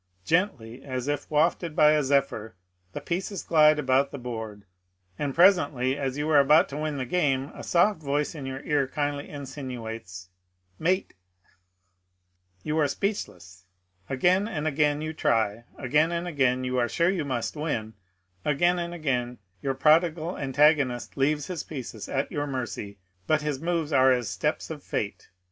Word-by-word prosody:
I 90 0 -42
Gently 135 - 0
as 130 -1 -4
if 145 0 -2
wafted 160 +1 +1
by 150 0 +6
a 155 0 +3
zephyr 135 -7 0 0.4
the - - -6
pieces 185 +2 -3
glide 155 -1 +5
about 135 -1 +2
the - - -7
board; 110 -5 -6 0.5
and 140 -2 -2
presently 145 -8 +4
as 135 -1 -3
you 150 +1 -1
are 150 - +7
about 150 +3 +5
to 140 - -6
win 155 -1 -2
the 130 - -2
game 140 -3 0
a - - -9
soft 175 +1 +2
voice 145 0 -1
in 145 -4 -7
your 135 +1 -5
ear 145 -3 +1
kindly 145 +1 -3
insinuates, 120 -9 -7 0.5
Mate 185 +4 0 0.3
I - - -35 1.1
You 155 +1 -1
are 150 - +3
speechless. 100 - -4 0.4
Again 180 +9 +2
and 155 -9 -4
again 150 0 +1
you 155 0 -4
try; 115 -5 0
again 150 +5 +2
and 170 0 -2
a^ain 130 -6 +1
you 125 0 0
are 120 -1 +1
sure 170 +1 +2
you 180 -5 -1
must 130 -2 -3
win; 120 -8 -3 0.5
again 175 +5 +2
and 170 0 -4
again 125 -6 -2 0.2
your 135 -1 -1
prodigal 160 +3 +3
antago 150 +2 +4
nist 125 -3 -3
leaves 145 +2 +1
his 180 -3 -4
pieces 125 -7 -7
at 135 0 -1
your 145 0 -2
mercy; 120 -6 -5 0.3
but 155 -1 +2
his 150 -2 -2
moves 165 -3 -1
are 130 -1 +6
as 125 -2 +1
the 95 - -4
steps - - -2
of - - -6
Fate. - - -4
145 Hz, 170 wpm, -26 LUFS, 130-155 Hz, 1.1 s, are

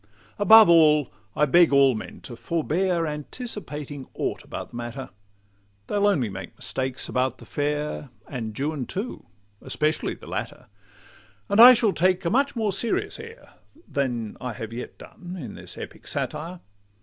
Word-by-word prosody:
Above 220 +1 +8
all, 155 -4 +5 0.2
I 150 - +3
beg 170 +3 +5
all 140 -1 +5
men 110 - -8
to 120 - -8
forbear 170 +7 0
Anticipating 150 - -5
aught - - -3
about - - -7
the - - -12
matter: 120 +3 -6 0.7
They'll 205 - +1
only 150 - +2
make 95 -1 -8
mistakes 130 0 -2
about 130 +1 -1
the - - -14
fair, 150 0 -3 0.2
And 110 -5 -6
Juan 145 -2 -2
too, 210 +6 -5 0.3
especially 155 +1 -1
the - - -15
latter. - - -5 0.8
And 200 +2 +2
I 245 +2 +12
shall 225 -4 +2
take 185 +1 +1
a 170 - +1
much 275 +4 +2
more 220 -3 0
serious 225 - -1
air 460 +2 -12 0.3
Than 120 -6 -2
I 125 -2 -4
have 115 -2 -7
yet 120 - -7
done, 180 0 -10
in 120 -9 -7
this - - -8
epic - - -9
satire. 170 +3 -4
150 Hz, 155 wpm, -25 LUFS, 130-195 Hz, 0.8 s, I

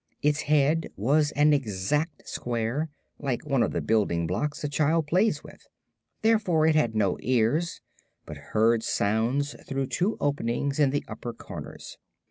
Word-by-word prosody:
Its 150 +1 +2
head 150 +2 +3
was 145 +8 +2
an 150 +1 +4
exact 140 - -1
square, 120 +6 -2 0.3
like 135 -3 -2
one 140 -4 +1
of 115 - +1
the - - -2
building 100 -7 +1
blocks 145 - -2
a - - 0
child 155 +2 +1
plays 185 +8 +1
with; - - -15 0.6
therefore 210 -8 +3
it 160 - +4
had 120 -8 +1
no 100 -4 +1
ears, 130 +7 +1 0.4
but 75 - -8 0.2
heard 115 +1 +4
sounds 115 +8 0
through 135 -1 -1
two 185 +10 -1
openings 140 0 -1
in 145 -2 +5
the 145 +1 -2
upper 115 +2 -6
corners. - - -9
140 Hz, 150 wpm, -27 LUFS, 115-155 Hz, 0.6 s, in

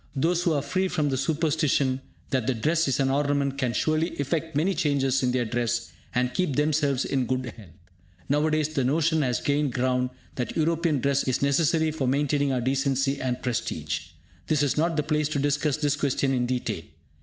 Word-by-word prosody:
Those 170 +5 +1
who 170 -2 +2
are 145 -2 0
free 185 +6 0
from 155 -5 0
the 135 - 0
superstition 145 -2 +1 0.3
that 130 -3 0
dress 165 +1 +2
is 135 - 0
an 135 -1 +2
ornament 140 -1 0
can 130 -3 +1
surely 155 +8 0
effect 160 +2 -2
many 170 +7 +2
changes 140 -5 +1
in 125 -1 +1
their 125 -1 0
dress, 120 0 -1 0.2
and 125 0 +1
keep 180 -5 0
themselves 145 -2 +1
in 130 -3 0
good 130 +1 -1
health. 105 -6 -13 0.6
Now 150 +2 +2
a - - +1
days 155 -1 +1
the 145 -4 -1
notion 160 +4 +2
has 125 -3 0
gained 145 -2 0
ground 125 0 +1 0.3
that 125 -3 -3
European 160 -2 +1
dress 140 +1 +1
is 130 +1 0
necessary 160 +3 +2
for 145 -4 -2
maintaining 140 +1 +1
our 125 -2 0
decency 135 +1 0
and 125 -1 -2
prestige! 125 -3 -2 0.4
This 150 -2 +2
is 140 - +1
not 165 +1 +1
the 150 - +2
place 150 0 0
to 155 - -2
discuss 145 0 +1
this 145 -1 +1
question 140 -1 0
in 125 -1 0
detail. 120 -7 -2
140 Hz, 195 wpm, -26 LUFS, 130-155 Hz, 0.6 s, who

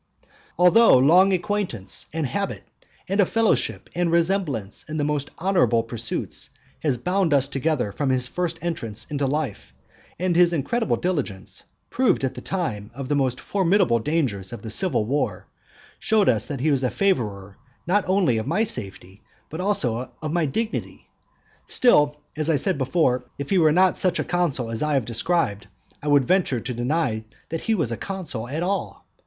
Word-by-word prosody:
Although 180 - +6
long 175 +9 +5
acquaintance, 185 - -2
and 160 -1 -2
habit, 200 +8 -3 0.4
and 195 +2 -1
a - - +6
fellowship 225 -1 +1
and 175 -1 0
resemblance 165 - 0
in 155 - -3
the 150 - 0
most 145 -1 -1
honourable 175 -11 +2
pursuits, 115 0 -3 0.3
has 140 -5 0
bound 180 +3 +1
us 140 -1 +2
together 140 -5 -1
from 140 +6 -2
his 125 -1 +2
first 170 +2 -2
entrance 115 -11 -3
into 145 -2 0
life; 140 -5 -3 0.4
and 180 0 0
his 175 0 +5
incredible 225 - 0
diligence, 145 - -3 0.3
proved 255 - +2
at 130 - 0
the 125 - -8
time 120 - -3
of 135 -1 -6
the 145 - +2
most 130 -3 0
formidable 190 - +2
dangers 115 - -1
of 120 - -8
the 110 - -4
civil 175 - +1
war, 140 +6 -1 0.5
showed 215 -2 +2
that 120 +5 -1
he 155 +2 +2
was 135 -2 +2
a 130 - +1
favourer 105 - -1 0.3
not 200 +3 +2
only 185 - +3
of 110 - -5
my 185 +9 +2
safety, 95 - -4 0.3
but 160 +3 -4
also 130 - -1
of 155 0 -4
my 170 -3 +1
dignity; 220 +11 -4 0.6
still, 150 - +3 0.2
as 155 +1 -2
I 160 - +4
said 140 0 0
before, 130 -2 +1
if 140 +4 -6
he 190 - +4
were 155 -2 +5
not 185 +3 +3
such 185 -1 +2
a - - 0
consul 145 -10 -1
as 115 - -3
I 150 -1 +1
have 130 -4 +1
described, 115 - -1 0.3
I 150 - -6
should 145 -2 +4
venture 180 -9 +2
to 125 - -4
deny 120 -2 -1 0.3
that 165 0 -3
he 225 - +1
was 155 - -1
a 115 - -2
consul 170 - -5
at 155 +5 -2
all. 195 +2 -3
150 Hz, 175 wpm, -23 LUFS, 125-180 Hz, 0.6 s, Although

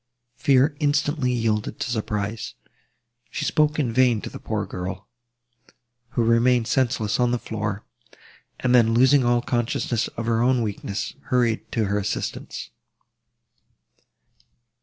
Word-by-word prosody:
Fear 140 +2 +3
instantly 145 -2 +1
yielded 115 -3 -1
to 125 - -2
surprise. 110 -1 -3 0.7
She 150 - -3
spoke 150 -1 +2
in 130 -7 0
vain 125 -2 +4
to - - -7
the - - -8
poor 105 -2 -2
girl, 95 +1 -6 1.1
who 120 - +4
remained 115 +1 +3
senseless 120 -3 0
on 125 -1 +3
the 125 - +1
floor, 105 -3 -4 0.8
and 125 -1 +1
then, 115 -2 +5
losing 130 +3 +5
all 120 0 +2
consciousness 120 -2 -1
of 115 - -3
her 115 0 +1
own 125 0 +3
weakness, 100 -1 -4
hurried 120 -3 0
to 110 -2 +1
her 100 +1 0
assistance. 100 +1 -4
120 Hz, 130 wpm, -24 LUFS, 110-125 Hz, 1.1 s, then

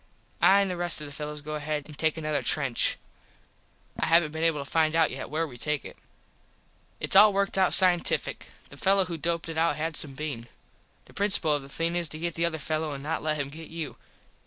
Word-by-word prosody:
I 200 +1 +6
an 195 - 0
the 180 - -4
rest 175 -2 -1
of 150 - -6
the 145 - -9
fellos 150 0 -6
go 155 +1 -6
ahead 150 -1 -3
an 155 - -11
take 155 +2 0
another 155 -3 -1
trench. 130 -1 +2 1.0
I - - 0
havnt 165 -1 +4
been 160 +1 -4
able 165 -3 +2
to 140 - -5
find 155 +3 +1
out 165 -1 +3
yet 130 0 -6
where 160 +2 -1
we 125 -6 -11
take 150 +3 -2
it. - - -9 1.0
Its - - -1
all 210 +2 +9
worked 200 0 -1
out 190 -1 +3
cientifick. 180 -2 +2 0.2
The - - -13
fello 195 0 +3
who 170 -1 -5
doped 170 +1 -1
it 160 -1 -4
out 165 -2 +2
had 155 +1 -3
some 140 -3 -3
bean. 135 -6 -5 0.6
The - - -19
principul 195 -6 +4
of 145 - -3
the 135 - -12
thing 165 +4 -2
is 170 -2 -1
to 155 - -7
get 170 +1 -3
the 170 +1 -1
other 165 -1 -2
fello 155 0 -3
an 140 0 -8
not 160 +2 -2
let 155 0 -1
him 140 -1 -3
get 160 +2 -10
you. 165 -2 -6
160 Hz, 230 wpm, -27 LUFS, 150-170 Hz, 1.0 s, all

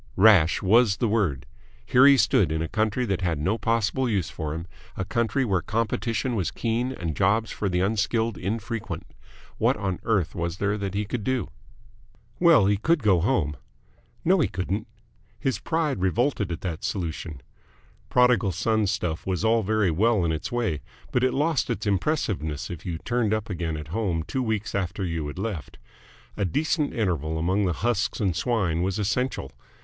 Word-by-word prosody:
Rash 95 -6 +5
was 105 +1 +4
the 115 - +1
word. 100 - 0 0.4
Here 130 +2 +6
he 140 -1 +7
stood, 80 - +3
in 80 +1 -1
a - - -3
country 110 +6 0
that 95 -4 -1
had 85 -4 0
no 95 +10 0
possible 115 +3 +1
use 95 -6 -1
for 75 -1 -4
him, 85 +1 -5 0.3
a 95 - -2
country 115 +5 0
where 95 -6 +1
competition 115 - -1
was 100 -7 0
keen 120 +2 -1
and 85 - -4
jobs 105 +4 +2
for 100 - -2
the 90 0 0
unskilled 110 +2 0
infrequent. 110 +4 -4 0.5
What - - +2
on 95 -2 -2
earth 100 -7 0
was 85 0 -3
there 105 +1 0
that 100 -2 -4
he 105 +1 0
could 110 +1 -4
do? 130 - -1 0.9
Well, 170 - +6
he 100 +1 +3
could 160 +6 +1
go 95 -4 +4
home.... 75 -5 0 0.7
No, 185 +3 +4
he 155 - +3
couldn't. 100 +4 -3 0.5
His 135 -3 -1
pride 160 - -1
revolted 105 0 +1
at 85 +2 -4
that 85 -4 -4
solution. 80 -5 -4 0.7
Prodigal 125 -6 +3
Son 110 +3 +1
stuff 90 -5 -2
was 95 +2 -1
all 115 +1 +4
very 110 -2 +1
well 105 +2 +2
in 80 - +1
its 80 -1 -3
way, 115 -11 -1 0.3
but 125 - +1
it 130 - +3
lost 150 +1 +1
its 105 - -2
impressiveness 95 - -1
if 85 +1 -7
you 85 -2 -2
turned 115 +2 0
up 110 0 -4
again 85 -3 -2
at 75 0 -8
home 90 -4 -1
two 130 +10 -3
weeks 110 -3 -2
after 95 0 -2
you 80 -3 -3
had 75 - -7
left. 95 -6 -5 0.6
A 105 - 0
decent 150 - 0
interval 80 - -1
among 95 +5 +1
the 90 - +1
husks 115 -3 0
and 95 -5 0
swine 90 -5 0
was 95 +2 -1
essential. 125 +5 -1
100 Hz, 180 wpm, -25 LUFS, 90-115 Hz, 0.9 s, he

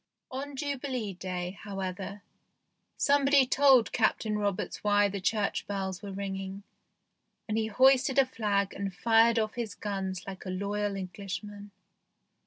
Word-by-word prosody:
On 275 +2 -5
Jubilee 265 -6 -3
Day, 180 0 -5
however, 195 0 -5 0.7
somebody 280 -1 +4
told 265 -2 +5
Captain 220 -1 +1
Roberts 205 -2 -2
why 205 0 +4
the 200 -1 -4
church 210 +1 0
bells 190 -2 -3
were 200 - -6
ringing, 195 0 -5 0.8
and 215 - -1
he 220 0 +1
hoisted 260 +4 +4
a 275 - +6
flag 205 -6 0
and 195 -1 -4
fired 230 +2 +4
off 215 -1 0
his 235 -3 -4
guns 190 -3 -4
like 190 -1 -7
a 185 - -6
loyal 200 +2 -2
Englishman. 200 +2 -6
205 Hz, 135 wpm, -29 LUFS, 195-235 Hz, 0.8 s, a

